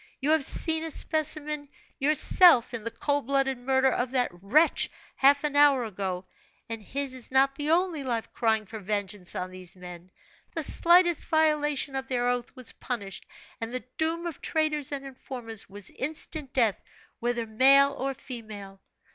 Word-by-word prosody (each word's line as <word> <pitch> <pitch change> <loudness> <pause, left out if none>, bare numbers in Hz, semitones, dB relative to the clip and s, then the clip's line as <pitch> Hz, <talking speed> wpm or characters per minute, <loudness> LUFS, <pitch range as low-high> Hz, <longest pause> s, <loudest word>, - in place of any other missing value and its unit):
You 285 +3 0
have 315 -2 +3
seen 320 +3 0
a 325 - -4
specimen 300 -2 +2 0.3
yourself, 300 -1 +5
in 230 -2 -5
the 230 - -3
cold 285 +3 -2
blooded 270 -2 +1
murder 265 +1 +2
of 245 0 -1
that 250 -1 0
wretch 210 - +2 0.3
half 280 +2 +4
an 295 -1 -2
hour 285 -3 +5
ago; 190 -3 -4 0.4
and 225 -1 -6
his 275 +5 -3
is 255 -2 -6
not 270 +1 +3
the 290 +2 -4
only 335 -3 +1
life 235 -4 -3
crying 220 -2 0
for 220 +2 -8
vengeance 200 -2 -3
on 185 0 -4
these 185 -1 -6
men. 180 -1 -11 0.5
The 325 - -1
slightest 345 +2 +4
violation 300 -3 +1
of 265 0 -4
their 245 -2 -1
oath 245 +1 -2
was 255 -3 -5
punished, 200 -6 -6 0.3
and 225 0 -4
the 255 0 -5 0.2
doom 330 +2 -1
of 335 -4 -6
traitors 305 -3 -1
and 275 -1 -5
informers 245 -5 -6
was 200 -1 -4
instant 300 0 -5
death, 230 -7 +1 0.4
whether 240 -1 -1
male 275 +5 +5
or 270 0 -3
female. 210 -7 -9
265 Hz, 165 wpm, -27 LUFS, 225-295 Hz, 0.5 s, yourself